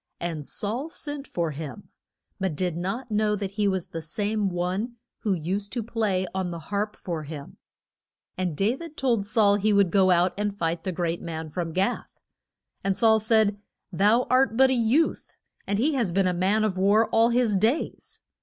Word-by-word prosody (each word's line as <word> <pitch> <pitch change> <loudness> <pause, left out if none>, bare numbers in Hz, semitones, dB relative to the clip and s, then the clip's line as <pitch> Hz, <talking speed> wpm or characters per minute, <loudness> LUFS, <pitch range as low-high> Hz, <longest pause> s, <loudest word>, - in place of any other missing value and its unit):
And 165 -3 -3
Saul 235 +9 -3
sent 290 -3 -4
for 170 -2 -2
him, 140 -4 -8 0.5
but 190 -5 -1
did 180 0 -1
not 200 +8 -4
know 210 0 +2
that 200 -2 -4
he 205 0 0
was 190 -3 -1
the 165 - -5
same 205 +5 -1
one 185 +7 -2 0.2
who 205 -4 0
used 190 +5 -3
to 240 -2 -2
play 210 -5 0
on 190 -1 -1
the 170 - -5
harp 205 +5 -3
for 170 -3 -4
him. 150 -1 -9 0.8
And 180 -5 -2
Da 210 +5 +2
vid 330 -1 -10
told 235 -7 +1
Saul 205 -1 +4
he 210 +1 +1
would 200 -4 +4
go 190 -2 +4
out 180 0 +3
and 205 -1 -1
fight 165 -2 -2
the 185 - -1
great 170 -1 -2
man 160 -1 -5
from 170 0 -3
Gath. 190 +8 -2 0.6
And 195 -1 0
Saul 220 -1 +5
said, 220 -2 +2 0.3
Thou 210 +7 +3
art 255 -3 +3
but 265 0 +6
a - - +3
youth, 250 +6 +1 0.3
and 200 +1 0
he 285 +8 +2
has 235 -9 0
been 195 +2 +2
a 180 - +2
man 195 +5 +2
of 205 -4 0
war 205 +4 +4
all 230 +1 +4
his 240 -3 +2
days. 225 - -1
200 Hz, 190 wpm, -26 LUFS, 180-225 Hz, 0.8 s, but